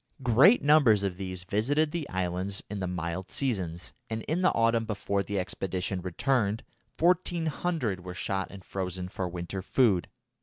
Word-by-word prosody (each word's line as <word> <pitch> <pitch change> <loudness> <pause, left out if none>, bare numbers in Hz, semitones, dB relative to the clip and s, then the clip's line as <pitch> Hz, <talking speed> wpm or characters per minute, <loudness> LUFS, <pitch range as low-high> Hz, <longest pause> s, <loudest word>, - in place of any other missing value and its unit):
Great 130 - +6
numbers 140 -9 +5
of 95 -2 -1
these 95 -2 -4
visited 140 +11 +1
the 165 -3 -3
islands 95 +2 -2
in 105 - -3
the 95 - -2
mild 90 +1 -4
seasons, 95 -10 -1 0.2
and 110 0 -3
in 165 +5 -1
the 185 - +4
autumn 115 0 +3
before 100 -2 -1
the 100 +1 -3
expedition 95 0 -2
returned 105 +4 0 0.3
1400 165 - 0
were 90 0 -7
shot 95 0 -2
and 95 -2 -11
frozen 90 -1 -3
for 95 0 -3
winter 90 +2 -5
food. 100 - +2
100 Hz, 155 wpm, -29 LUFS, 90-130 Hz, 0.3 s, Great